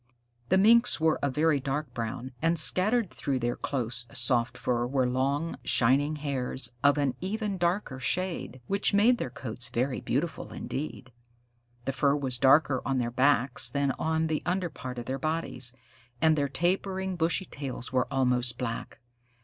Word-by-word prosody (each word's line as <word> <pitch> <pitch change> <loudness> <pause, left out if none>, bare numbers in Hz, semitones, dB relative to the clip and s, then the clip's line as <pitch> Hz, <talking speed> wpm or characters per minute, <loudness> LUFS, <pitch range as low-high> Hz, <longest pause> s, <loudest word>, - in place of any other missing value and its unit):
The 190 - +4
Minks 230 +3 +5
were 160 0 +2
a 140 - +1
very 150 +2 +2
dark 140 0 -3
brown, 120 +2 -4
and 165 +1 +2
scattered 210 +5 +2
through 135 -2 -2
their 120 -1 -1
close, 120 -3 -2
soft 120 -1 +2
fur 120 -1 0
were 130 -1 +1
long, 140 +6 -1
shining 140 +5 +2
hairs 130 -4 -2
of 145 +1 +5
an 140 -3 +1
even 200 0 -2
darker 170 -6 -1
shade, 170 -4 -3
which 200 - +1
made 230 +4 +4
their - - -3
coats 120 0 -6
very 130 +2 -1
beautiful 140 +3 -2
indeed. 130 -2 -6 0.7
The 135 - -1
fur 140 +1 +2
was 130 -4 +1
darker 135 -1 +4
on 135 -1 -1
their 120 -1 -1
backs 130 0 +3
than 140 -1 0
on 160 0 0
the 155 -1 -1
under 180 -1 -1
part 125 -1 -7
of 120 - -5
their 135 +2 -3
bodies, 155 -5 -2 0.5
and 160 +2 +4
their 140 -2 0
tapering, 190 +4 -1
bushy 170 +2 0
tails 135 -5 -7
were 130 -1 +2
almost 125 -2 +1
black. 115 -2 -4
140 Hz, 165 wpm, -28 LUFS, 125-165 Hz, 0.7 s, Minks